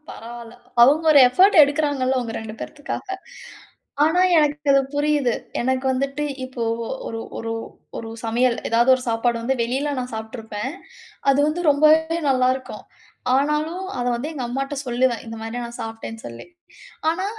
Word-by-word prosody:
பரவால்ல. 235 0 -9 0.3
அவங்க 295 +6 +5
ஒரு 295 - +7
எஃபோர்ட் 375 +10 +5
எடுக்குறாங்கள்ல, 285 -3 +1
உங்க 230 -2 -5
2 220 -1 -7
பேத்துக்காக. 290 +6 -6 1.0
ஆனா, 320 +4 +3 0.2
எனக்கு 295 -1 +1
அது 275 - +5
புரியுது. 290 -4 +2 0.3
எனக்கு 260 +2 0
வந்துட்டு 275 +3 -2 0.2
இப்போ 255 -2 -5 0.4
ஒரு 225 - -5 0.2
ஒரு 225 0 -4 0.4
ஒரு 225 - -6
சமையல் 235 +2 +1
ஏதாவது 235 +2 +3
ஒரு 255 - -6
சாப்பாடு 230 +1 +1
வந்து 260 +3 0
வெளில 265 +5 -1
நான் 250 0 -5
சாப்பிட்டுருப்பேன். 220 +1 -5 0.6
அது 275 - +2
வந்து 315 +3 -1
ரொம்பவே 315 +3 +4
நல்லா 255 -1 +3
இருக்கும். 260 - -9 0.5
ஆனாலும் 300 +6 0
அத 245 - -1
வந்து 280 +7 -4
எங்க 270 -5 -4
அம்மாட்ட 275 +3 -3
சொல்லுவேன். 245 -1 0
இந்த 225 - -6
மாரி 225 +2 -5
நான் 235 +1 -9
சாப்பிட்டேன்னு 225 0 -7
சொல்லி. 115 0 -10 0.6
ஆனா, 365 +4 -1
260 Hz, 150 wpm, -22 LUFS, 235-295 Hz, 1.0 s, ஒரு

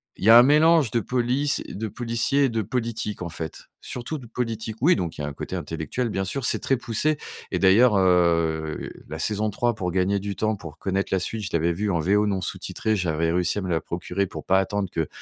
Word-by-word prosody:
Il - - -10
y - - +6
a 115 - +10
un 120 - +9
mélange 150 -2 +4
de 115 - +2
police 125 +5 0
de 110 +2 -4
policiers 120 +5 0
et 135 - +3
de 115 -1 -1
politique, 110 -3 -3
en 85 - -4
fait, 80 -1 -7 0.2
surtout 130 +5 -5
de 120 - -12
politique. 115 -2 -4
Oui, 170 +8 +5
donc 85 -2 -3
il - - -5
y - - -4
a - - -2
un 70 - -5
côté - - -6
intellectuel, 80 - -3
bien 95 -2 -1
sûr, 125 +7 -3
c'est - - +2
très 135 - +1
poussé. 140 +7 0 0.3
Et - - -1
d'ailleurs, 105 +4 +5
heu, 85 -4 +1 0.2
la 80 - -5
saison 105 +5 0
3, 120 +3 0
pour 90 -4 -3
gagner 95 +2 +1
du 100 0 -4
temps, 110 0 0
pour 85 -6 -10
connaître 95 0 -2
la 95 - +3
suite, 110 +4 -3
je 105 - -4
l'avais 85 +1 +2
vu 105 +4 -2
en 85 - +1
VO 105 +6 +2
non 95 -2 -1
sous - - -3
titré, 110 0 -2
j'avais 85 -3 0
réussi 90 +3 0
à - - -1
me 90 - -4
la 80 - +1
procurer 90 +3 -3
pour - - -8
pas 95 +1 +4
attendre 100 0 -1
que 80 -2 -1
100 Hz, 245 wpm, -24 LUFS, 90-115 Hz, 0.3 s, a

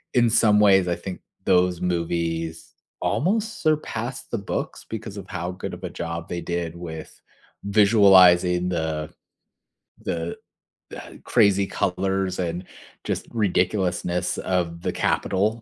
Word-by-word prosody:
in 120 -2 +4
some 105 -2 +4
ways, 95 -3 +5
I 85 - +1
think 90 +1 -7 0.2
those 90 -1 +3
movies 85 -2 -2 0.3
almost 215 +7 0
surpassed 135 -6 -2
the 115 - 0
books 100 - -4
because 110 -2 -6
of 95 -1 -8
how 90 +1 -3
good 90 - -6
of - - -15
a - - -3
job 85 0 -5
they 85 -1 -3
did 85 -1 -3
with 80 -2 -9 0.4
visualizing 95 -4 +5
the 80 -3 -2 0.9
the 85 0 -3 0.5
the - - -10
crazy 100 -1 +3
colors 95 0 -1
and 90 +1 -2 0.4
just - - -3
ridiculousness 90 -4 0
of 85 -2 -1
the - - -1
Capitol 110 +4 0
90 Hz, 125 wpm, -24 LUFS, 85-100 Hz, 0.9 s, ways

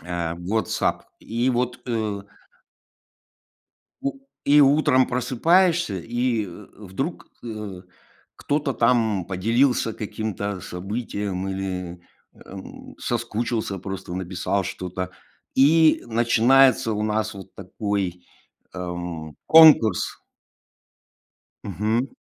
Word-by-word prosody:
Э, 85 -1 -3
WhatsApp. 100 +6 -1 0.2
И 120 +3 -1
вот, 125 0 -1
э 110 -4 -2 1.8
У 275 0 -3 0.3
и 145 +1 +6
утром 140 -2 +4
просыпаешься, 160 - +2
и, 120 +1 -1
э, 95 +3 -11
вдруг, 105 - -5 0.2
э, 105 -5 -6 0.5
кто-то 145 -1 -1
там 115 -6 +2
поделился 115 +6 +1
каким-то 105 -2 -4
событием 100 0 -4
или, 90 -2 -4 0.3
эм, 95 0 -11
соскучился 115 -3 -2
просто, 95 -1 -6
написал 95 +1 -2
что-то. 90 +1 -5 0.4
И 155 +3 +5
начинается 120 +2 +4
у 105 - -2
нас 110 0 -1
вот 95 -1 -11
такой, 95 -2 -3 0.5
эм, 85 -4 -6
конкурс. 155 - +6 1.5
Мгм. 110 +7 -1
110 Hz, 90 wpm, -23 LUFS, 95-125 Hz, 1.8 s, и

